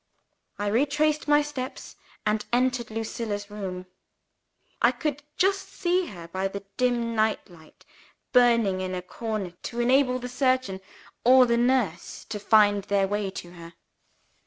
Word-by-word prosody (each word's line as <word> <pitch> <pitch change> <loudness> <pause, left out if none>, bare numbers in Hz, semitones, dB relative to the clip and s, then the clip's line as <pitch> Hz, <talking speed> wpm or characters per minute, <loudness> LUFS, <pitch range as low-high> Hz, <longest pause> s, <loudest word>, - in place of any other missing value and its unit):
I 205 - -3
retraced 295 +8 +1
my 295 0 +5
steps, 270 -3 -6 0.3
and 210 0 +1
entered 250 -1 +1
Lucilla's 220 -2 -4
room. 185 -3 -5 1.0
I - - +5
could 300 -4 -3 0.2
just 390 0 +1
see 360 0 0
her, 170 - -9
by 190 +3 -2
the 200 0 -7
dim 240 -2 0
night 220 -1 0
light 160 -2 -18 0.5
burning 230 -6 +4
in 185 0 -3
a 180 - -5
corner 215 -1 -4
to 235 - -5
enable 255 +1 +3
the 250 0 -6
surgeon 255 -6 0 0.4
or 255 +1 +7
the 235 -1 +2
nurse 235 -8 0
to 210 - -4
find 205 -1 +4
their 200 -1 +1
way 205 0 -1
to 175 -2 -8
her. 170 -1 -12
230 Hz, 145 wpm, -26 LUFS, 200-255 Hz, 1.0 s, or